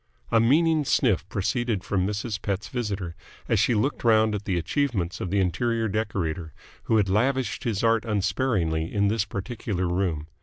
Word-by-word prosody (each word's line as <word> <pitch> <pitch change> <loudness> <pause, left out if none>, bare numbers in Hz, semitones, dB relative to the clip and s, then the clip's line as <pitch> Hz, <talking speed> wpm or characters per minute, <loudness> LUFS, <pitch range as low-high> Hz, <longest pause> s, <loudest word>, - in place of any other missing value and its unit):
A 115 - +5
meaning 155 +6 +3
sniff 110 -9 +1
proceeded 110 0 -1
from 95 -2 0
Mrs. 105 0 -3
Pett's 100 -2 -3
visitor 100 -8 -3 0.3
as 115 - +2
she 110 +3 +3
looked 130 +8 0
round 110 -2 +4
at 105 -1 -4
the 95 -3 0
achievements 95 - -1
of 90 - -3
the 100 +2 +1
interior 115 +5 0
decorator, 95 -7 -2 0.3
who 110 - +3
had 105 -2 +3
lavished 130 +7 0
his 110 -3 -1
art 115 -1 +3
unsparingly 95 -7 0
in 100 -1 +2
this 110 -1 0
particular 100 -3 -3
room. 85 -4 -1
105 Hz, 165 wpm, -25 LUFS, 95-115 Hz, 0.3 s, A